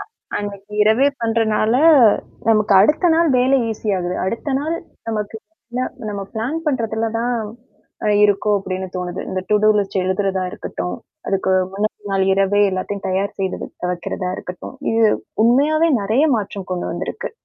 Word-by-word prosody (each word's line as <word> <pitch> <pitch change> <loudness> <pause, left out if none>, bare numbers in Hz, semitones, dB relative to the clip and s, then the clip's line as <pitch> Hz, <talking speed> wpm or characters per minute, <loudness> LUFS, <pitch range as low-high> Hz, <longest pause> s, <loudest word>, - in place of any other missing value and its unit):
அ - - -4 0.3
அன்னக்கி 205 0 -6
இரவே 220 +6 +4
பண்றனால, 225 -1 +1 0.8
நமக்கு 215 -2 +3
அடுத்த 310 - +4
நாள் 335 0 +3
வேலை 260 +2 +4
ஈசி 215 0 -5
ஆகுது. 180 0 -2
அடுத்த 230 +9 -2
நாள் 315 +4 -2 0.3
நமக்கு 210 -1 -3 0.4
இல்ல 250 - -1 0.3
நம்ம 200 -1 -4
பிளான் 235 +8 -2
பண்றதுல 225 -5 0
தான் 240 +1 0 0.7
அ - - +2 0.2
இருக்கும் 205 +1 +2
அப்பிடின்னு 185 -1 -4
தோணுது. 180 0 -4
இந்த 185 - -2
டுடூலிஸ்ட் 210 -2 +3
எழுதுறதா 190 0 0
இருக்கட்டும், 90 - -5 0.3
அதுக்கு 190 -1 +1 0.2
முன்ன 210 +2 0 0.2
நாள் 195 -1 +2
இரவே 195 +1 +2
எல்லாத்தையும் 195 +2 -4
தயார் 190 +2 -1
செய்தது 190 -1 -3 0.2
வைக்கிறதா 180 +1 -4
இருக்கட்டும். 180 +7 -8 0.2
இது 225 - +2 0.4
உண்மையாவே 305 +7 +3
நெறைய 220 +9 +2
மாற்றம் 200 -2 -5
கொண்டு 180 - -3
வந்திருக்கு. - - -5
210 Hz, 140 wpm, -20 LUFS, 190-230 Hz, 0.8 s, இரவே